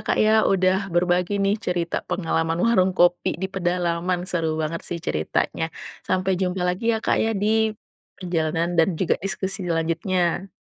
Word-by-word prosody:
Kak - - +1
ya, 215 - +4 0.2
udah 190 +1 +2
berbagi 180 +2 +2
nih 195 - +3
cerita 175 -4 -2
pengalaman 165 -2 0
warung 190 -5 +3
kopi 175 0 +3
di - - +1
pedalaman, 175 0 -1
seru 165 -4 -1
banget 165 +2 -3
sih 175 - -3
ceritanya. 80 - -1 0.4
Sampai 185 +1 +1
jumpa 180 0 -1
lagi 180 +5 -2
ya 220 - 0
Kak - - +2
ya 225 - +1
di 210 - +2 0.7
kegiatan 170 -2 -1
dan 165 - +5
juga 185 - +2
diskusi 195 +1 -3
selanjutnya. 170 +3 0
180 Hz, 150 wpm, -23 LUFS, 170-190 Hz, 0.7 s, dan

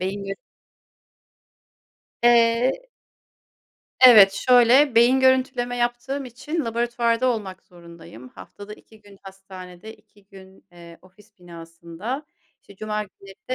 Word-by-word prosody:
beyin 195 +2 -5 2.0
Eee 240 - +2 1.2
Evet, 220 -7 +7
şöyle, 250 +5 +3
beyin 240 +3 +3
görüntüleme 255 -2 0
yaptığım 245 +3 -4
için 285 +6 -6
laboratuvarda 235 +1 -2
olmak 210 -7 -4
zorundayım. 170 -9 -16
Haftada 200 - -13
2 220 0 -22
gün 205 -2 -20
hastanede, 190 +1 -13
2 210 -2 -28
gün, 190 -1 -18
eee, 170 -1 -16
ofis 205 +3 -24
binasında, 170 - -10 0.3
işte, 200 - -20
cuma 215 +1 -5
günleri 195 -1 -16 0.2
de 255 - -1
215 Hz, 105 wpm, -21 LUFS, 190-245 Hz, 2.0 s, Evet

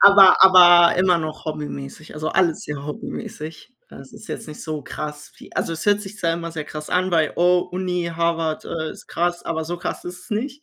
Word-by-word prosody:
Aber, 200 -2 +8
aber 175 -2 +7
immer 185 -1 +3
noch 155 0 -6
hobbymäßig, 150 -1 -7
also 155 +1 -3
alles 175 -3 +1
sehr 145 -1 -6
hobbymäßig. 155 +6 -8 0.2
Es - - -13
ist - - -13
jetzt - - -6
nicht 150 - -9
so 155 -2 -5
krass, 150 0 -7
wie - - -15
also - - -1
es 165 - -6
hört 205 0 +3
sich 205 +1 -10
zwar 165 -3 0
immer 170 0 -6
sehr 155 -2 -5
krass 150 0 -8
an 185 +1 +1
bei: 160 -3 +2
Oh, 180 +1 +4
Uni, 180 -2 -2
Harvard, 165 -1 -1
äh, 160 -1 -4
ist - - -13
krass, 175 0 -1
aber 160 -1 -3
so 175 +2 -5
krass - - -5
ist 180 0 -8
es - - -18
nicht. 260 +7 -3
170 Hz, 215 wpm, -21 LUFS, 155-180 Hz, 0.2 s, Aber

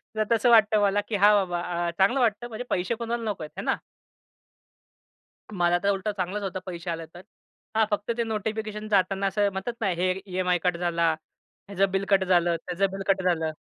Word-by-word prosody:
तर 215 - +2
तसं 230 +2 +4
वाटतं 215 -2 +5
मला 205 0 +2
की 220 - -2
हां 205 +1 +6
बाबा 180 -3 0 0.3
अ, - - -1
चांगलं 200 +8 +3
वाटतं. 235 -1 +1
म्हणजे 235 +1 -6
पैसे 185 +6 0
कोणाला 235 0 -3
नको 190 -6 -4
आहेत, 150 - -8
है - - -4
ना? - - +1 1.8
मला 175 -1 +2
तर 200 - +2
उलटं 200 +2 0
चांगलाच 190 +3 -2
होता 190 -1 -3
पैसे 175 -1 -6
आले 165 0 -4
तर. 175 +3 -14 0.5
हां 220 0 +4
फक्त 205 +2 -1
ते 235 - +1
नोटिफिकेशन 215 -1 -4
जाताना 195 -1 +2
असं 200 +1 +1
म्हणतात 195 +5 -4
ना 200 - +1
हे 185 +1 +2
एक 190 +1 -4
ईएमआय 180 -1 +1
कट 180 -1 +1
झाला, 170 -1 +1 0.6
ह्याचं 195 -1 +1
बिल 195 +1 0
कट 195 -1 +4
झालं, 175 -2 +3
त्याचं 180 +2 0
बिल 195 0 -5
कट 195 -1 +2
झालं. 165 -3 +1
195 Hz, 200 wpm, -26 LUFS, 180-215 Hz, 1.8 s, हां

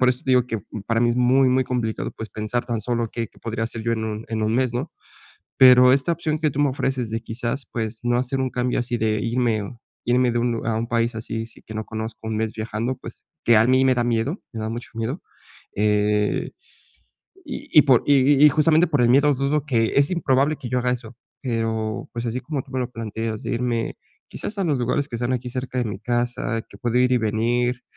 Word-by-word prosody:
por 130 - +4
eso 125 - -3
te 130 - +1
digo 125 -1 +4
que 115 -3 -2 0.3
para 115 -1 +1
mí 120 - +3
es 120 - -1
muy, 130 +2 +4
muy 130 +1 +2
complicado, 120 -3 -2
pues, 110 - -7
pensar 110 +4 -3
tan 120 -3 -2
solo 120 0 -1
qué, 115 -2 -4
qué - - -22
podría 115 0 -3
hacer 115 0 -5
yo 115 - 0
en 110 -1 -2
un 110 0 -4
en 110 -1 -2
1 110 +1 +1
mes, 125 -1 +1
¿no? 135 +7 -3 0.7
Pero 125 -1 +8
esta 135 +5 +2
opción 155 -2 -1
que 155 -1 +1
tú 140 - -5
me 145 -1 +4
ofreces 130 -3 -2
de, 115 +1 -3
quizás, 120 +4 -4
pues, 110 -1 -3
no 120 0 +2
hacer 130 +2 -1
un 130 -1 0
cambio 125 0 -1
así 120 0 -2
de 110 -1 0
irme, 115 -2 0
o 115 +4 -9 0.3
irme 125 0 +3
de 120 - +1
un 120 +1 +1
lug 115 -1 -3
a 115 - +1
un 115 +1 -2
país 115 0 0
así 110 0 -4
sí 115 - -15
que 110 - -10
no 110 0 -4
conozco, 110 0 -6
1 110 - -2
mes 110 0 -1
viajando, 115 +3 -3
pues, - - -12 0.2
que 120 - +6
a 110 - +5
mí 130 +1 +4
me 130 - +5
da 120 - +1
miedo, 120 - -1
me 115 - -6
da 110 0 -3
mucho 120 +1 -6
miedo. 115 +9 -3 0.5
Eh, 105 0 +1 0.9
y - - -7
y - - +7
por 130 -5 +4
y 145 - +6 0.3
y - - +11
y - - +9
justamente 160 +3 +4
por 145 -5 +1
el 120 - +4
miedo, 140 +3 +5
dudo 140 +2 0
que 115 -6 +1
es 140 +4 +4
improbable 145 -3 +2
que 120 - -7
yo 125 - +1
haga 125 0 0
eso, 120 -2 -5 0.3
eh, 115 -4 -1
o 110 -1 -3
pues, 120 0 -4
así 120 +3 -2
como 145 -5 -4
tú 135 - -18
me 130 - -2
lo 125 -1 -2
planteas 110 0 -4
de - - -3
irme, 120 -1 -1 0.3
quizás, 210 - -5
a - - +1
los 150 -5 +1
lugares 140 +4 0
que - - -4
están 120 +2 -1
aquí 125 0 -3
cerca 130 +1 -4
de 120 - 0
mi 100 -2 -4
casa, 120 -1 -1
que 100 - -14
puedo 120 +3 0
ir 125 0 +3
y - - +4
venir. 120 +3 0
120 Hz, 250 wpm, -23 LUFS, 115-130 Hz, 0.9 s, y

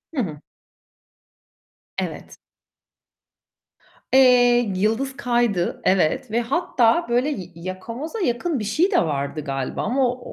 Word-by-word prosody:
Hı 260 - +1
hı. 150 -5 -7 1.6
Evet. - - -5 1.8
Eee, 245 -4 +5
yıldız 225 +8 -1
kaydı. 240 -8 0
Evet 195 +7 +1
ve 235 - +1
hatta 250 +1 +1
böyle 245 +5 +1
ya 195 -11 -4
yakamoza 205 - -6
yakın 295 - -1
bir - - -4
şey 315 - +1
de - - +4
vardı 145 -1 -2
galiba 135 -2 -3
ama 255 +3 +1
o 250 +1 -5
240 Hz, 115 wpm, -22 LUFS, 185-265 Hz, 1.8 s, Eee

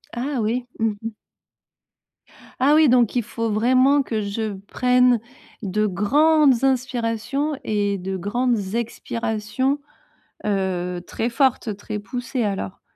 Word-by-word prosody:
Ah, 265 +3 -2
oui, 240 +3 -1
mmh 225 0 +2
mh. 225 0 -5 1.5
Ah, 275 +3 +4
oui, 310 -1 +6
donc 245 -2 +3
il 245 - +2
faut 230 +1 -3
vraiment 255 +6 +4
que 220 -4 -2
je 210 +1 -3
prenne 250 -1 +3 0.4
de 210 +1 0
grandes 275 - +3
inspirations 255 +2 0
et 205 -2 0
de 190 +1 -4
grandes 215 0 -1
expirations, 235 +3 -2 0.7
heu, 185 -3 -1
très 235 +2 -2
fortes, 245 -4 +1
très 210 +1 -5
poussées 245 +4 -4
alors? 195 -1 -3
230 Hz, 120 wpm, -22 LUFS, 210-255 Hz, 1.5 s, oui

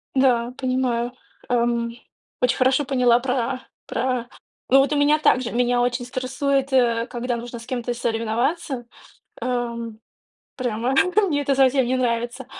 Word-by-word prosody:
Да, 250 -2 +2
понимаю, 255 -2 0 0.4
эм. 235 -1 0 0.5
Очень 250 0 +2
хорошо 265 +3 +3
поняла 250 -3 +3
про 255 0 -1 0.2
про 245 0 -2 0.4
Ну, 270 - +7
вот 275 +2 +2
у - - +1
меня 290 +1 +4
так 255 - +4
же, 240 - -4
меня 245 0 +2
очень 245 0 0
стрессует, 265 +2 -1
э, 235 -2 +3
когда 245 -1 -3
нужно 240 +1 -7
с 230 - -11
кем-то 245 -1 -3
соревноваться, 240 +4 -1 0.6
эм. 235 -2 -3 0.6
Прямо 245 -1 -1 0.4
мне 290 -3 0
это 280 0 +1
совсем 265 -1 +3
не 255 +2 +1
нравится. 240 +1 -1
245 Hz, 145 wpm, -23 LUFS, 235-265 Hz, 0.6 s, Ну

